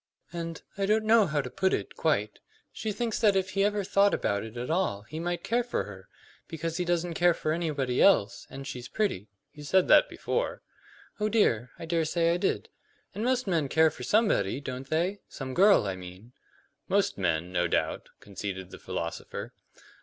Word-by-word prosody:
"And 165 -1 -5 0.2
I 195 - +1
don't 215 +1 +2
know 220 -2 +5
how 150 -2 0
to 125 - -7
put 190 0 +1
it, - - -6
quite 105 -10 0 0.3
she 220 - -4
thinks 230 +1 -2
that 210 -3 +4
if 190 -1 0
he 195 +1 +1
ever 205 0 +1
thought 200 +1 +3
about 100 0 -1
it 110 +1 -9
at 125 +5 -3
all 165 - 0
he 155 +8 -7
might 175 0 -2
care 240 +2 +1
for 240 - -2
her; 95 -2 -11 0.4
because 165 +1 -4
he 180 - -1
doesn't 175 0 0
care 175 0 +3
for 155 - -2
anybody 145 -6 0
else, 120 - +3
and 135 0 -8
she's 130 -3 -6
pretty 200 - -1
" 140 - -52
"You 150 - -11
said 185 +5 +3
that 305 - +7
before." - - -2 0.6
"Oh 210 0 +1
dear, 125 - +2
I - - -7
dare 165 -1 0
say 165 +1 +2
I - - +1
did. 190 - -1 0.4
And 210 - -4
most 255 +1 +1
men 165 -8 0
care 160 +1 +4
for - - -12
somebody, 135 - +2
don't 135 -1 -6
they? 180 +6 0
Some 130 -1 -6
girl, 195 - +5
I 95 -1 -2
mean." 90 +6 -11 0.5
"Most 200 - +1
men, 85 -1 0
no 90 -1 +1
doubt," - - -1
conceded 95 -2 -6
the - - -10
philosopher. 85 0 -5
165 Hz, 200 wpm, -28 LUFS, 120-195 Hz, 0.6 s, that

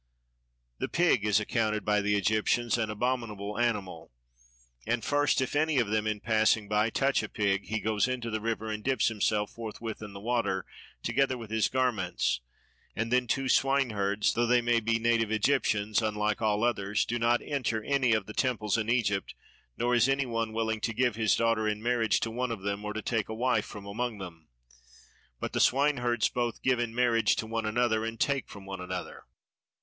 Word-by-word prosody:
The - - -2
pig 170 - +2
is 105 0 +3
accounted 110 0 -1
by 105 0 +2
the 105 0 +1
Egyptians 110 +4 +1
an 115 -2 -1
abominable 105 -2 -2
animal; 100 - -2 0.8
and 115 0 0
first, 145 -1 +2
if 130 - -2
any 155 0 +2
of 120 -5 +2
them 110 0 0
in 105 -1 -1
passing 110 -1 +2
by 105 +2 +2
touch 135 +4 +1
a - - -6
pig, 100 -2 0
he 110 +1 -1
goes 105 +1 +1
into 125 -3 -3
the 110 0 -2
river 110 -1 -2
and 105 0 -5
dips 130 -4 +2
himself 105 -1 0
forthwith 115 -1 -6
in 105 -2 -8
the 100 - -8
water 110 -4 -1 0.4
together 135 -2 +1
with 115 -3 -9
his 110 -1 +2
garments; 110 - 0 0.6
and 115 +3 -2
then 125 -1 +2
too 135 +3 0
swineherds, 110 -7 +2
though 120 0 +1
they 125 +1 +4
may 120 0 +2
be 115 0 +1
native 115 -1 +1
Egyptians, 110 -2 +1
unlike 105 0 -1
all 105 0 +1
others, 105 -3 +1
do 120 +1 -2
not 120 +1 +2
enter 120 -6 -2
any 130 -2 +2
of 110 -3 0
the 105 - -9
temples 115 -4 0
in 110 0 -2
Egypt, 105 -5 0 0.4
nor 120 +1 +1
is 120 +2 +4
anyone 120 -5 0
willing 110 -1 -1
to 115 - -2
give 125 -1 +1
his 110 -2 +2
daughter 115 -2 +1
in 105 0 -1
marriage 115 -2 +1
to 115 - -2
one 125 +2 -2
of 110 -5 -5
them 100 +1 -2
or 105 - -3
to 110 0 -5
take 110 -3 -1
a 110 - -4
wife 125 +3 +1
from 105 -2 -9
among 115 +3 -3
them; 85 -5 -10 0.9
but - - -4
the - - 0
swineherds 125 -4 +2
both 120 -2 -3
give 130 -2 +2
in 115 -1 -2
marriage 120 -2 +3
to - - -3
one 115 0 -2
another 110 0 +1
and 115 0 -4
take 140 -2 0
from 100 -1 -11
one 95 -1 -6
another. 90 0 -6
115 Hz, 195 wpm, -29 LUFS, 105-120 Hz, 0.9 s, they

